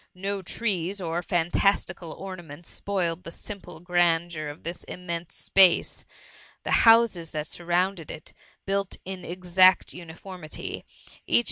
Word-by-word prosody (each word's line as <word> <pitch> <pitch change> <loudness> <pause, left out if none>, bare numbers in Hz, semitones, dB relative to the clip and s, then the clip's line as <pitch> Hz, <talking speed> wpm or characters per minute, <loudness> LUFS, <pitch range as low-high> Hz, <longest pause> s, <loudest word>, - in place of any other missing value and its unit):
No 195 +1 -3
trees 195 -1 -1
or 170 -1 -2
£antastU 175 +2 +1
cal 170 -3 -9
ornaments 175 -4 -9
spoiled 180 -4 -2
the - - -7
simple 175 -4 -8
grandeur 175 -2 +1
of 145 - -10
this 170 +1 -5
immense 170 -2 -5
space; 190 -3 +4 0.6
the - - -3 0.2
houses 225 -8 +5
that 150 -1 -2
sur« 170 +2 -6
xounded 175 -1 +1
it, 155 - -7 0.3
built 195 0 -1
in 185 -1 -6
exact 185 +1 +4
uniformity, 175 -1 -7
each - - -41
S72 - - -23
THE - - -11
MUMMY. - - +9
175 Hz, 145 wpm, -26 LUFS, 170-190 Hz, 0.6 s, MUMMY